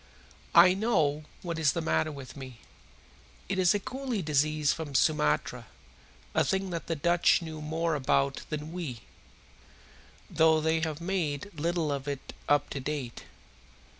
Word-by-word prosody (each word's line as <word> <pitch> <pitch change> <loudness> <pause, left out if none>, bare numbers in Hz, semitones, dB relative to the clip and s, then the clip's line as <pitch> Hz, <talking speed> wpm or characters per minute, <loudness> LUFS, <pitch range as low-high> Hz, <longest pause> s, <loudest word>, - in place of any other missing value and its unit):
"I 180 +2 +9
know 155 -8 +1 0.2
what 170 -2 -3
is 150 -3 +3
the - - -1
matter 80 - +1
with 140 -3 -9
me. 130 -4 -9 0.9
It 195 -1 -1
is 185 +2 +4
a - - +1
coolie 260 - -4
disease 150 0 +2
from 150 -4 -6
Sumatra 130 - +1 0.7
a - - +3
thing 190 -1 -1
that 170 -1 -4
the 165 - -1
Dutch 170 +3 +3
know 160 -1 -7
more 160 +2 -1
about 140 -1 +1
than 155 0 -4
we, 155 -10 -5 1.3
though 160 0 +4
they 160 +1 +1
have 160 -1 -3
made 170 -1 -2
little 165 0 -1
of 140 0 -3
it 140 -2 -5 0.2
up 145 0 +3
to 140 - -3
date. 135 -3 -5
155 Hz, 150 wpm, -29 LUFS, 145-170 Hz, 1.3 s, I